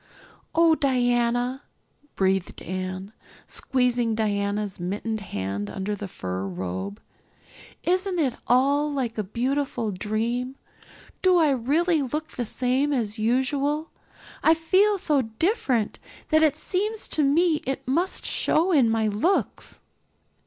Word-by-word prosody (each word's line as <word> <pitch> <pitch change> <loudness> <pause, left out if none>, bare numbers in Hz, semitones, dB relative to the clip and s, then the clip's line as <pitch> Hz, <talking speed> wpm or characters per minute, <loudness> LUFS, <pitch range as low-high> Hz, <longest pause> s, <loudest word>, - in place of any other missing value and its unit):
"Oh, 330 0 +5
Diana," 245 -2 +1 0.5
breathed 190 -1 0
Anne, 185 +3 -5 0.3
squeezing 245 -3 0
Diana's 205 -2 -1
mittened 205 +5 -3
hand 100 - -4
under 190 - -3
the 205 0 -6
fur 95 - -4
robe, 95 +2 -5 0.8
"isn't 370 +1 0
it 280 -7 +1
all 280 +4 +3
like 255 -5 -2
a - - 0
beautiful 245 +1 -1
dream? 230 +6 -2 0.7
Do 370 -1 +5
I 315 -4 +4
really 300 +6 +2
look 300 +4 -3
the 245 - -3
same 260 +5 +1
as 225 -5 -1
usual? 280 +7 +1 0.5
I 320 - +5
feel 385 +6 +3
so 300 -6 +2
different 245 - 0 0.3
that 315 0 +4
it 305 -2 +4
seems 410 +7 -2
to 310 - +1
me 315 +3 +3
it 270 -1 -3
must 340 +8 0
show 345 +4 +2
in 270 -9 +4
my 225 -1 +1
looks." 215 - -1
250 Hz, 125 wpm, -25 LUFS, 210-305 Hz, 0.8 s, Oh